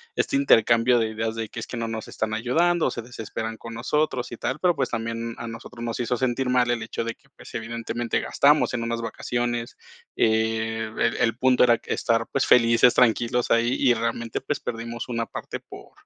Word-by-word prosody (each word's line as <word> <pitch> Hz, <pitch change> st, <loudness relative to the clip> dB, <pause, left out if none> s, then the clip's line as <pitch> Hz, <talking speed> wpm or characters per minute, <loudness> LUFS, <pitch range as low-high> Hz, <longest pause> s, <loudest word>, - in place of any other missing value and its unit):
este 285 Hz, -, 0 dB
intercambio 120 Hz, -, +4 dB
de 110 Hz, -1 st, 0 dB
ideas 110 Hz, +1 st, -3 dB
de 115 Hz, -2 st, -4 dB
que, 120 Hz, -, -7 dB
es -, -, -6 dB
que: 120 Hz, -, -6 dB
"No 115 Hz, -1 st, -2 dB
nos 110 Hz, -1 st, -5 dB
están 110 Hz, 0 st, -3 dB
ayudando, 160 Hz, +10 st, +2 dB
o -, -, -1 dB
se 120 Hz, -, -5 dB
desesperan 110 Hz, -1 st, -6 dB
con 115 Hz, 0 st, -9 dB
nosotros 130 Hz, +1 st, -1 dB
y 120 Hz, -, -6 dB
tal", 135 Hz, -, -3 dB
pero, 180 Hz, -2 st, +3 dB
pues, 135 Hz, -3 st, -1 dB
también 115 Hz, 0 st, -3 dB
a 115 Hz, -, -6 dB
nosotros 115 Hz, +1 st, -9 dB
nos 115 Hz, 0 st, -3 dB
hizo 120 Hz, 0 st, 0 dB
sentir 130 Hz, +1 st, 0 dB
mal 125 Hz, -1 st, +3 dB
el 120 Hz, -, -1 dB
hecho -, -, -4 dB
de 115 Hz, 0 st, -3 dB
que, 140 Hz, -3 st, -30 dB
pues, -, -, -13 dB
evidentemente 115 Hz, 0 st, -2 dB
gastamos 145 Hz, -2 st, +3 dB
en 120 Hz, -, -1 dB
unas 115 Hz, 0 st, -2 dB
vacaciones. 120 Hz, +1 st, -3 dB, 0.4 s
Eh, 110 Hz, 0 st, +1 dB
el -, -, +1 dB
el 115 Hz, 0 st, +1 dB
punto 130 Hz, -1 st, +4 dB
era 120 Hz, -2 st, +4 dB
estar, 115 Hz, -1 st, 0 dB
pues, 140 Hz, -, +1 dB
felices, 115 Hz, 0 st, +5 dB
tranquilos 120 Hz, 0 st, +2 dB
ahí, 115 Hz, +2 st, +3 dB
y 125 Hz, -3 st, +5 dB
realmente, 115 Hz, 0 st, -2 dB
pues, 145 Hz, +2 st, -2 dB
perdimos 115 Hz, +1 st, -5 dB
una 115 Hz, -1 st, -1 dB
parte -, -, -6 dB
por -, -, -13 dB
115 Hz, 205 wpm, -24 LUFS, 115-125 Hz, 0.4 s, felices